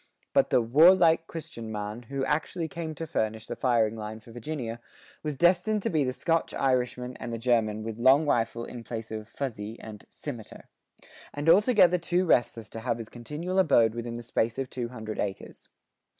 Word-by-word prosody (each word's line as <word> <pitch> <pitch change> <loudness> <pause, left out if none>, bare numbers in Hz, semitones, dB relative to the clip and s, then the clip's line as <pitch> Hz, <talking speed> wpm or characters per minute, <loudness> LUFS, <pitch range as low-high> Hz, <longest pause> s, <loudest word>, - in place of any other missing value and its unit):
But - - +4
the 120 - +3
"warlike 165 +6 +5
Christian 115 -9 -7
man" 105 +2 -4
who 135 -1 -2
actually 160 +3 -1
came 160 -1 -5
to 165 - -5
furnish 110 -8 -2
the - - -5
firing 115 -4 +2
line 110 0 -6
for 115 +1 -15
Virginia, 120 -1 -5 0.4
was 150 -3 -4
destined 185 +5 +3
to - - 0
be 155 -4 +2
the 130 - 0
Scotch 165 +5 -1
Irishman 125 -1 0
and - - -6
the 115 - -3
German 110 -3 +1
with 110 0 -6
long 135 +5 +5
rifle 115 -3 0
in 120 -2 -8
place 115 -1 -6
of 110 0 -6
"fuzee" 115 -4 -5
and 105 -2 -10
"simeter," 120 -8 -8 0.7
and 145 +2 -4
altogether 180 -1 +5
too 175 +2 +1
restless 120 - +1
to 115 - -6
have 115 0 -1
his 115 -2 -8
continual 150 +10 -3
abode 120 - +4
within 120 0 -5
the 120 - -6
space 115 0 -1
of 135 -1 -3
two 125 -2 -3
hundred 110 -3 -6
acres. 100 -2 -5
125 Hz, 185 wpm, -28 LUFS, 115-160 Hz, 0.7 s, warlike